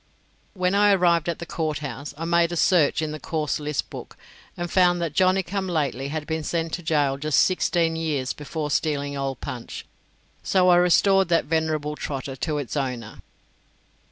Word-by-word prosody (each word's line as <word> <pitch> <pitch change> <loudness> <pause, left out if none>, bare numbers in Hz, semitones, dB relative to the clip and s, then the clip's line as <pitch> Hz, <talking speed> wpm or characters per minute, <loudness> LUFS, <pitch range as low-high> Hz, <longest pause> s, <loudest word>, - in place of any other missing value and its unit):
When 180 0 0
I 205 0 +5
arrived 170 -3 +2
at 170 - -2
the 170 - -7
court 155 -3 -2
house, 145 0 -6
I 165 - -4
made 170 0 +2
a - - -2
search 160 -3 +3
in 155 - -3
the 155 - -6
cause 155 +1 -2
list 150 -1 -3
book, - - -9 0.4
and 175 0 -4
found 180 -1 +4
that 165 -3 -2
Johnny 185 +2 +3
come 190 +1 -3
lately 145 -6 -1
had 150 +1 -4
been 160 0 -3
sent 165 +1 -2
to 180 - -3
gaol 145 -4 +1
just 150 0 +2
sixteen 170 -3 +2
years 150 -6 -2
before 150 0 -5
for - - +1
stealing 145 -2 -1
Old 135 -2 -3
Punch, 120 -2 -7 0.6
so 185 -1 +3
I 175 - +6
restored 190 +2 +4
that 170 -1 +2
venerable 155 -1 -1
trotter 135 -2 -5
to 150 +3 -2
its 145 -2 -4
owner. 125 -6 -4
160 Hz, 185 wpm, -24 LUFS, 145-175 Hz, 0.6 s, I